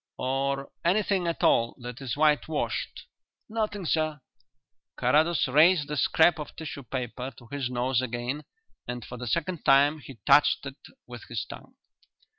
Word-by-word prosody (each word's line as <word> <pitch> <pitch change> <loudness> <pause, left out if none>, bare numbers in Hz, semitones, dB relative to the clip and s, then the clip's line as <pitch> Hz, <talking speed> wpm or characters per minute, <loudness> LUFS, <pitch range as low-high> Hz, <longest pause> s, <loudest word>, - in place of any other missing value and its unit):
"Or 135 +1 -1
anything 190 0 +1
at 170 - -2
all 115 0 +3
that 125 +2 -8
is 135 0 -4
whitewashed?" 150 0 0 0.4
"Nothing, 215 -3 -3
sir." 155 -2 0 0.8
Carrados 155 +6 +3
raised 150 +3 +5
the 150 - -2
scrap 160 +3 +4
of 150 - -7
tissue 150 -3 -7
paper 125 0 -5
to 120 - -15
his 140 -3 -2
nose 125 0 0
again, 125 +4 -3 0.4
and 125 -1 -5
for 125 - -8
the 125 0 -6
second 170 +5 -2
time 145 +3 +5
he 135 -2 -11
touched 145 -1 +5
it 140 0 -7 0.3
with - - -10
his - - -4
tongue. - - -12
140 Hz, 150 wpm, -27 LUFS, 125-160 Hz, 0.8 s, raised